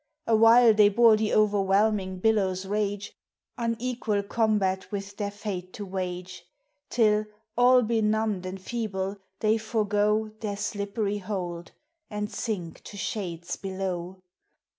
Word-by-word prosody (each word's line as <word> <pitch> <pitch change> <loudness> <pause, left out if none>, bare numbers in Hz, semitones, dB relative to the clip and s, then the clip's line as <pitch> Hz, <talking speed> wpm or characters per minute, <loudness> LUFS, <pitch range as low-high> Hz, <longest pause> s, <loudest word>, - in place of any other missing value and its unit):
Awhile 225 +1 +6
they 210 -1 +6
bore 225 +1 +6
the 215 0 0
o'erwhelming 200 -1 +2
billows' 195 -4 +1
rage, 205 0 -2 0.5
Unequal 230 -2 -1
combat 205 -3 0
with 200 -1 -5
their 205 -1 -2
fate 200 -3 -6
to 205 - -6
wage; 185 -1 -5 0.5
Till, 215 -2 +3 0.3
all 250 +1 +6
benumbed 215 -3 0
and 190 +1 -6
feeble, 195 -2 -3 0.2
they 220 +1 +3
forego 215 0 +1
Their 205 -2 -3
slippery 205 0 -2
hold, 180 -4 -5 0.4
and 210 -1 -4
sink 185 -8 -4
to 205 - -9
shades 175 -5 -4
below. 190 -2 -4
205 Hz, 120 wpm, -27 LUFS, 190-220 Hz, 0.5 s, Awhile